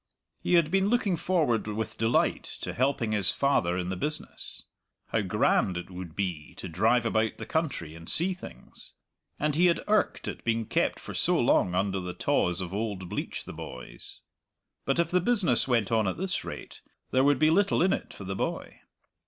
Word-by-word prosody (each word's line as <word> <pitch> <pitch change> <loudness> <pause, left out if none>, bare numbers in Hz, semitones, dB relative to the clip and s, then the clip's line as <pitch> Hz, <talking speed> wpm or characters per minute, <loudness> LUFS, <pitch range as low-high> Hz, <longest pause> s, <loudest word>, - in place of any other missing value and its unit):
He 180 - +2
had 165 -2 +4
been 195 +1 +3
looking 225 -6 +2
forward 155 -11 +1
with 110 +1 -3
delight 115 +1 +2 0.2
to - - -4
helping 125 -3 0
his 100 -3 +3
father 100 -12 +1
in 90 0 -2
the 95 - -2
business 150 +12 -5 0.5
how - - +1
grand 90 -2 +2
it 90 +2 -7
would 90 -3 -8
be 90 -6 -3
to - - -7
drive 110 +8 +2
about 110 -1 +1
the - - -6
country 145 - -2
and 85 0 -10
see 185 +3 +2
things! 185 - -11 0.5
and 150 0 +1
he 175 +5 +4
had 170 - +1
irked 215 0 +1
at - - -5
being 115 -1 0
kept - - 0
for - - -8
so - - +3
long 90 -1 +3
under 95 0 0
the 90 -1 -5
tawse 90 +1 +1
of 90 0 -5
old 100 -4 -3
Bleach - - -4
the - - -8
boys. 60 -1 -9 0.6
But 135 - +1
if 170 -1 +1
the 180 0 +3
business 195 - +2
went 120 -5 +1
on 110 -3 +2
at 95 - -2
this 185 +1 -2
rate - - -8 0.3
there 130 +1 +3
would 145 -1 +4
be 155 +3 +4
little 200 0 +3
in 190 - +3
it - - -4
for - - -9
the 95 0 -4
boy. - - -4
115 Hz, 195 wpm, -28 LUFS, -, 0.6 s, had